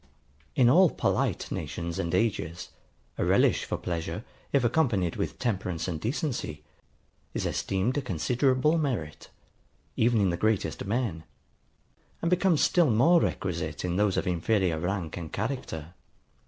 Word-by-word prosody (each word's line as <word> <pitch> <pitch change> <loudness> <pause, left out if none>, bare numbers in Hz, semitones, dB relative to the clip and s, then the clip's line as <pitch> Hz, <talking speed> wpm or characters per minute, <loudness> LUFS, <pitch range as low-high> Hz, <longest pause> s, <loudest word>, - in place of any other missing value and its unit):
In 125 - +5
all 175 +8 +6
polite - - -1
nations 85 -1 -4
and 85 - -1
ages, 90 -5 -1 0.5
a - - +2
relish - - +3
for - - -2
pleasure, 85 +4 -4 0.3
if 140 -3 +3
accompanied 120 - +1
with - - -3
temperance 95 -8 -2
and 80 -4 -3
decency, 115 - -3 0.7
is - - -1
esteemed 100 +9 0
a - - -3
considerable 130 - +1
merit, 115 - -3 0.7
even 115 0 +3
in 95 -3 +3
the 85 - -2
greatest 110 0 0
men; 100 -6 -1 1.0
and 170 - -1
becomes 180 -3 +3
still 175 -5 +4
more 160 +10 +5
requisite 85 -4 -2
in 90 -1 -1
those 105 -2 +2
of - - 0
inferior 90 -1 +1
rank 90 -1 -3
and 80 -3 -6
character. 95 - -4
100 Hz, 140 wpm, -28 LUFS, 85-130 Hz, 1.0 s, all